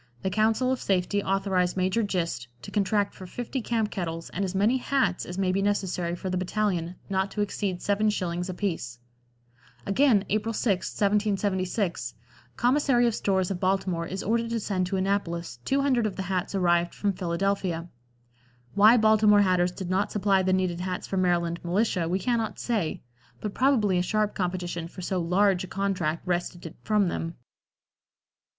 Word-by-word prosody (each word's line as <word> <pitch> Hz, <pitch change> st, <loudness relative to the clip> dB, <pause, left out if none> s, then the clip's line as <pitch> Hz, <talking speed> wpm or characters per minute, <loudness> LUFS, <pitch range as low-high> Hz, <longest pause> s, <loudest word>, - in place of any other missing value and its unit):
The 190 Hz, -, 0 dB
Council 220 Hz, +5 st, +2 dB
of 260 Hz, -, -1 dB
Safety 195 Hz, +1 st, +1 dB
authorize 190 Hz, -2 st, 0 dB
Major 185 Hz, +4 st, +1 dB
Gist 170 Hz, -, -2 dB, 0.2 s
to -, -, -8 dB
contract 205 Hz, 0 st, +1 dB
for 185 Hz, -, -10 dB
fifty 245 Hz, +6 st, -4 dB
camp 225 Hz, -2 st, -1 dB
kettles 165 Hz, -3 st, -4 dB
and 195 Hz, -, -2 dB
as 190 Hz, 0 st, -3 dB
many 215 Hz, +7 st, +3 dB
hats 245 Hz, -8 st, 0 dB
as 180 Hz, -, -6 dB
may 190 Hz, -1 st, +1 dB
be 195 Hz, +2 st, 0 dB
necessary 185 Hz, -4 st, -1 dB
for 180 Hz, -, -6 dB
the 185 Hz, 0 st, -1 dB
battalion, 185 Hz, -3 st, -1 dB
not 190 Hz, 0 st, 0 dB
to 210 Hz, -, -3 dB
exceed 195 Hz, -3 st, -2 dB
7 205 Hz, +1 st, +2 dB
shillings 180 Hz, -3 st, -2 dB
apiece." 170 Hz, -, -3 dB, 0.9 s
Again, 210 Hz, -1 st, +3 dB
April 215 Hz, +2 st, 0 dB
6, 200 Hz, -4 st, 0 dB
1776, 195 Hz, -, 0 dB, 0.4 s
"Commissary 250 Hz, -1 st, +3 dB
of 235 Hz, -, +2 dB
Stores 190 Hz, -3 st, 0 dB
of 185 Hz, -, -3 dB
Baltimore 185 Hz, -3 st, 0 dB
is 190 Hz, +1 st, -4 dB
ordered 230 Hz, +2 st, 0 dB
to 230 Hz, 0 st, -1 dB
send 185 Hz, -4 st, -1 dB
to 190 Hz, +1 st, -1 dB
Annapolis 175 Hz, -8 st, -2 dB
200 270 Hz, -4 st, +2 dB
of 200 Hz, -, -5 dB
the 190 Hz, -, -3 dB
hats 185 Hz, +1 st, -2 dB
arrived 175 Hz, -2 st, +2 dB
from 205 Hz, -1 st, 0 dB
Philadelphia." 180 Hz, -1 st, -1 dB, 0.9 s
Why 215 Hz, +4 st, +7 dB
Baltimore 215 Hz, -2 st, +5 dB
hatters 180 Hz, -2 st, +2 dB
did 185 Hz, 0 st, -6 dB
not 195 Hz, +2 st, +1 dB
supply 200 Hz, -2 st, +2 dB
the 185 Hz, 0 st, +1 dB
needed 185 Hz, -2 st, 0 dB
hats 180 Hz, 0 st, -3 dB
for 195 Hz, -, -3 dB
Maryland 170 Hz, -2 st, +1 dB
militia 180 Hz, -1 st, 0 dB
we 180 Hz, -, +1 dB
cannot 230 Hz, +1 st, -1 dB
say, 210 Hz, -10 st, -2 dB, 0.4 s
but 210 Hz, -2 st, -4 dB
probably 225 Hz, -9 st, +3 dB
a -, -, +2 dB
sharp 210 Hz, +3 st, 0 dB
competition 175 Hz, -2 st, -3 dB
for 180 Hz, +2 st, -10 dB
so 185 Hz, +1 st, -1 dB
large 185 Hz, +2 st, +2 dB
a -, -, -6 dB
contract 180 Hz, -5 st, -1 dB
wrested 175 Hz, -1 st, -2 dB
it 165 Hz, -, -8 dB
from 210 Hz, -3 st, +2 dB
them. 165 Hz, -1 st, -3 dB
190 Hz, 170 wpm, -27 LUFS, 180-210 Hz, 0.9 s, Why